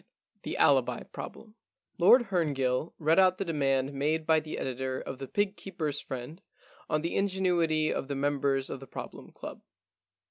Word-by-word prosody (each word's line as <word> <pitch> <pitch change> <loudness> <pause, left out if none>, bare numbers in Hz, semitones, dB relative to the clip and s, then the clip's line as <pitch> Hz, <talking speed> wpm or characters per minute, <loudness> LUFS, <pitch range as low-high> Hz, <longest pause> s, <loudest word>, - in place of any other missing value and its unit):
IX - - -42
THE - - -4
ALIBI - - +3
PROBLEM 215 - -8 0.5
Lord 225 +6 +6
Herngill 145 -4 0
read 160 +2 +3
out 185 -1 +5
the 195 - -2
demand 135 -4 +1
made 155 +3 0
by 160 0 +4
the 155 0 -6
editor 130 0 -3
of 130 - -7
The 135 - -5
Fig 205 +6 0
Keepers' 160 -8 -3
Friend 130 +8 -7 0.5
on 155 0 +1
the 170 - -2
ingenuity 175 -5 +2
of - - -3
the 140 - -3
members 140 -1 0
of - - -5
the 135 - -11
Problem - - -8
Club. - - -9
155 Hz, 170 wpm, -29 LUFS, 135-175 Hz, 0.5 s, Lord